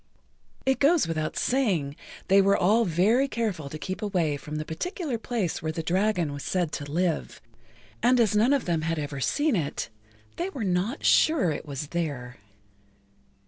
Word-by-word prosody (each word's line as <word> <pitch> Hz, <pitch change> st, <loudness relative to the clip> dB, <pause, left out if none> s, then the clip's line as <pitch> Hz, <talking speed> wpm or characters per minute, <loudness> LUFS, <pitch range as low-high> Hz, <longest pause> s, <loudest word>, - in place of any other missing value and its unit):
It 265 Hz, 0 st, +2 dB
goes 300 Hz, -, +4 dB
without 155 Hz, -1 st, -2 dB
saying 190 Hz, -, +1 dB, 0.3 s
they 195 Hz, +1 st, +6 dB
were 200 Hz, +1 st, +4 dB
all 220 Hz, +6 st, +3 dB
very 210 Hz, -, +3 dB
careful 210 Hz, -, -3 dB
to 155 Hz, -, -6 dB
keep 185 Hz, +4 st, -5 dB
away[Pg 210 Hz, -1 st, -3 dB, 0.3 s
12] -, -, -17 dB
from 150 Hz, -, -7 dB
the 155 Hz, 0 st, -3 dB
particular 290 Hz, -, -3 dB
place 220 Hz, -9 st, -2 dB
where 155 Hz, -1 st, -2 dB
the 160 Hz, 0 st, -4 dB
dragon 180 Hz, -3 st, +1 dB
was 145 Hz, -, -6 dB
said 175 Hz, -4 st, -1 dB
to 145 Hz, -1 st, -5 dB
live, 170 Hz, 0 st, -1 dB, 0.6 s
and 245 Hz, +2 st, +4 dB
as 215 Hz, -3 st, +3 dB
none 225 Hz, +5 st, +4 dB
of 280 Hz, -3 st, +2 dB
them 170 Hz, -3 st, 0 dB
had 165 Hz, +1 st, -1 dB
ever 145 Hz, -2 st, -4 dB
seen 290 Hz, -, +1 dB
it, 155 Hz, -6 st, -2 dB, 0.5 s
they 350 Hz, +3 st, -2 dB
were 270 Hz, -, -5 dB
not 190 Hz, -, -1 dB
sure 305 Hz, -, +4 dB
it 150 Hz, -, -5 dB
was 140 Hz, +1 st, -5 dB
there. 140 Hz, -8 st, -3 dB
180 Hz, 180 wpm, -26 LUFS, 155-235 Hz, 0.6 s, they